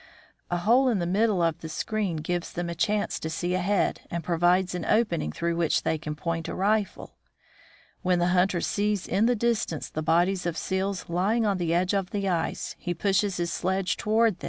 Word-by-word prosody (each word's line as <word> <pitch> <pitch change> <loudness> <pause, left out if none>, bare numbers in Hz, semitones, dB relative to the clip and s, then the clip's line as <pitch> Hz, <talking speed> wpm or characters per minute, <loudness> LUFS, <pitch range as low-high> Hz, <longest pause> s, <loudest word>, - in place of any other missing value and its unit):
A 175 - 0
hole 235 +9 +4
in 230 - +1
the 175 - -1
middle 195 0 +2
of 165 -2 0
the 160 - -6
screen 205 +1 -2
gives 170 +3 -3
them 175 0 -3
a - - -2
chance 205 -2 0
to 160 - -4
see 175 +3 -2
ahead, 185 +2 +1
and 170 -1 -3
provides 175 +2 +2
an 180 - -3
opening 210 - +1
through 170 - -2
which 165 -2 +1
they 160 - 0
can 150 -1 -5
point 165 +1 -3
a - - -4
rifle. 205 +1 -1 0.8
When 180 -1 +2
the 175 0 +2
hunter 180 -1 +2
sees 205 -2 0
in 205 +5 +2
the 245 - +3
distance 225 -8 -1
the 155 - -3
bodies 175 +3 +2
of 170 - -2
seals 190 0 -2
lying 200 +7 +1
on 200 -3 +1
the 170 -2 0
edge 180 +2 +1
of 195 -2 0
the 200 -1 -2
ice, 170 -3 -2
he 175 -1 -3
pushes 200 +2 +1
his 170 -1 -1
sledge 190 +1 0
toward - - -6
A 220 +1 +4
Herd 230 -1 +5
of 185 - -11
Seals. - - -35
180 Hz, 220 wpm, -27 LUFS, 170-205 Hz, 0.8 s, Herd